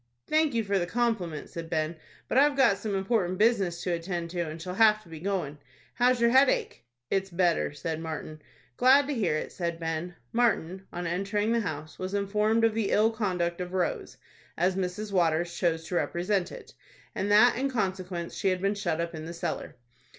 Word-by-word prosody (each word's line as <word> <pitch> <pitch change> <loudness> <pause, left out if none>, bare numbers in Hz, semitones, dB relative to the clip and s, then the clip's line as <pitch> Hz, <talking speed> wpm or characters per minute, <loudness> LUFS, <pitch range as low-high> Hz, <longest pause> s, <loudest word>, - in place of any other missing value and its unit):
"Thank 310 -4 +2
you 230 - +2
for 200 -1 +1
the 175 - -2
compliment," 210 -9 -1
said 165 -1 -7
Ben; 155 0 -1 0.3
"but - - -3
I've 280 +1 +4
got 235 -8 +4
some 205 -1 -3
important 190 -2 0
business 200 -6 +2
to 180 - -1
attend 170 0 -3
to, 175 - -4
and 160 -1 -5
shall 180 +2 -5
have 215 +1 +4
to 170 - -18
be 160 -1 -8
goin'. 170 -6 -3 0.3
How's 250 0 +3
your 235 0 +4
headache?" 265 - +3 0.3
"It's 195 0 0
better," 170 -4 +1
said 160 +2 -4
Martin. 155 -1 -6 0.4
"Glad 270 +3 +6
to 290 - -2
hear 205 - 0
it," - - -5
said 170 -2 -3
Ben. 165 +2 -3 0.2
Martin, 195 -6 0
on 175 0 -5
entering 200 +5 -1
the 235 - +2
house, 155 -6 -5
was 185 +2 -3
informed 210 +3 +1
of 225 -1 +4
the 220 -2 0
ill 220 +2 +3
conduct 180 -6 -1
of 180 0 -5
Rose, 180 -2 -2 0.4
as 180 +2 +2
Mrs. 195 +3 -3
Waters 170 -2 +1
chose 165 -2 0
to 180 - -7
represent 180 +2 0
it, - - -11 0.4
and 200 - -2
that 225 +4 +6
in 275 +3 0
consequence 185 -7 -3
she - - -2
had 185 -1 0
been 195 +2 +1
shut 175 -6 -2
up 170 0 -2
in 155 -1 -6
the 170 - -6
cellar. 170 - -4
185 Hz, 200 wpm, -28 LUFS, 170-215 Hz, 0.4 s, Glad